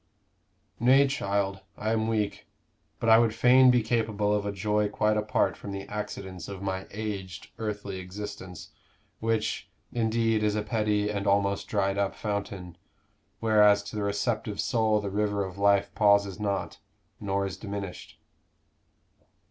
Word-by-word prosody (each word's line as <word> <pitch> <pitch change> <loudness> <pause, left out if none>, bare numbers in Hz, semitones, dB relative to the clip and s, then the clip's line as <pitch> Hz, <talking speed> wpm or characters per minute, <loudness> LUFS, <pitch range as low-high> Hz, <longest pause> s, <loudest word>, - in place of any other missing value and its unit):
"Nay, 130 +4 +6
child, 100 -7 -1 0.2
I 110 - -1
am 110 -1 +1
weak. 105 -2 -2 0.5
But 115 - -2
I 110 0 +8
would 115 -2 +2
fain 125 +2 +6
be 125 -2 +4
capable 110 -2 0
of 105 -1 0
a - - -1
joy 105 +1 0
quite 105 +1 +1
apart 105 0 +1
from 100 - -8
the 100 0 -5
accidents 95 -4 -6
of 100 -1 -7
my 95 -1 -3
aged 100 -4 -6
earthly 100 -3 -4
existence, 95 -1 -8 0.5
which, 115 -1 -1 0.2
indeed, 115 -1 +1
is 105 -1 +1
a 105 - -1
petty 105 -1 0
and 100 -1 -3
almost 100 0 +1
dried 100 -1 0
up 100 -1 0
fountain 100 -4 -4 0.6
whereas 105 -2 +5
to 105 - -8
the 105 - -2
receptive 100 +1 -1
soul 110 -3 +2
the 100 -1 -4
river 105 -1 0
of 95 +1 -9
life 100 0 +3
pauses 100 -2 +3
not, 100 -2 -2 0.4
nor 100 -1 -1
is 95 -1 -4
diminished." 100 -2 -7
105 Hz, 150 wpm, -28 LUFS, 100-110 Hz, 0.6 s, I